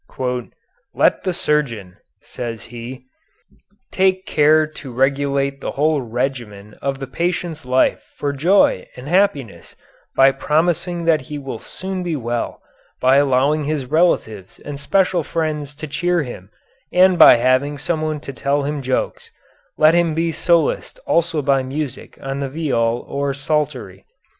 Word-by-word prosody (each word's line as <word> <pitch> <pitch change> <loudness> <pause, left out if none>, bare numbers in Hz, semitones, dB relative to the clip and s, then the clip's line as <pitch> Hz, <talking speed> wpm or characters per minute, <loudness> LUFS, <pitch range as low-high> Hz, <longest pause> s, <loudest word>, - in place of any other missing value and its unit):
"Let - - +2
the 185 - +1
surgeon," 120 - -1 0.3
says 115 -2 -6
he, 125 +2 -8 0.9
"take 185 0 +1
care 155 +1 +4
to 150 -3 -10
regulate 140 +1 0
the - - -3
whole 150 0 +2
regimen 120 -4 -4
of 140 -1 -2
the 135 - -5
patient's 165 +1 -3
life 130 +1 +2 0.2
for 145 -1 -2
joy 160 - +3
and 125 +2 -10
happiness 145 - 0 0.4
by 135 0 +6
promising 170 +5 0
that 160 -2 +3
he 150 -1 -7
will 135 -5 -6
soon 190 0 -6
be 175 -3 -2
well, 120 -3 -3 0.4
by 130 +2 +4
allowing 140 +2 +2
his 150 -3 -2
relatives 125 - 0
and 145 -1 -6
special 180 +4 +2
friends 150 -2 -3
to 155 - -7
cheer 175 +3 0
him 100 -8 -9 0.4
and 185 0 +4
by - - +10
having 130 +4 +1
someone 155 0 -2
to 140 - -7
tell 140 +2 0
him 145 0 -3
jokes, 130 -1 -2
and - - -14
let 155 +1 +7
him 170 -2 +2
be 165 +1 0
solaced 170 - +1
also 165 -3 +1
by 135 -1 +2
music 135 +1 -5
on 135 0 -3
the 140 -1 -3
viol 120 -6 -1
or 140 -1 -2
psaltery. 135 -9 -2
145 Hz, 145 wpm, -20 LUFS, 130-160 Hz, 0.9 s, by